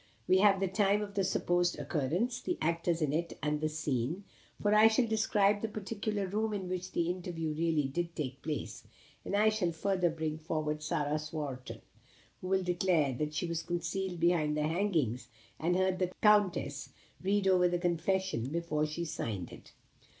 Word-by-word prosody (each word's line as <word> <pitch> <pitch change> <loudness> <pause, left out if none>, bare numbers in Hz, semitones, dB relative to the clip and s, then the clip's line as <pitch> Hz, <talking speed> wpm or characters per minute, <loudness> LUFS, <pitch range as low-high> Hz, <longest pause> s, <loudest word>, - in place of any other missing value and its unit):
We 185 - +5
have 195 -1 +5
the 195 - +1
time 200 +2 +2
of 200 -1 -7
the 200 -1 +1
supposed 175 -1 +1
occurrence 160 - -1
the 355 - -2
actors 170 0 0
in 145 -2 0
it 170 +2 -2
and 150 0 0
the 155 - +1
scene 155 - -2 0.4
for 205 0 +2
I 215 +1 +8
shall 225 +2 +3
describe 210 -2 +2
the 225 - -1
particular 210 -1 -3
room 215 +3 -1
in 190 -2 -4
which 185 0 -4
the 170 - +1
interview 170 -3 -4
really 160 -2 +1
did 170 +5 -3
take 135 -3 -4
place, 120 -6 -4 0.4
and - - -2
I 215 +2 +5
shall 210 -5 0
further 180 +1 +1
bring 160 -1 -3
forward 155 -1 -2
Sarah 150 0 -1
Swarton, 150 -4 -6 0.6
who 185 - -5
will 190 0 +2
declare 175 -5 +2
that 150 +4 -3
she 165 - -1
was 170 -1 -2
concealed 175 +2 -3
behind 160 -3 +2
the 150 - +1
hangings, 155 - 0 0.3
and 175 +3 +1
heard 185 0 +1
the 180 -1 0
Countess 195 -9 +3 0.3
read 195 +1 +1
over 180 -1 +5
the 175 0 0
confession 175 -6 0
before 155 -1 -1
she 170 +3 -4
signed 105 - -4
it." - - -13
175 Hz, 180 wpm, -32 LUFS, 155-195 Hz, 0.6 s, I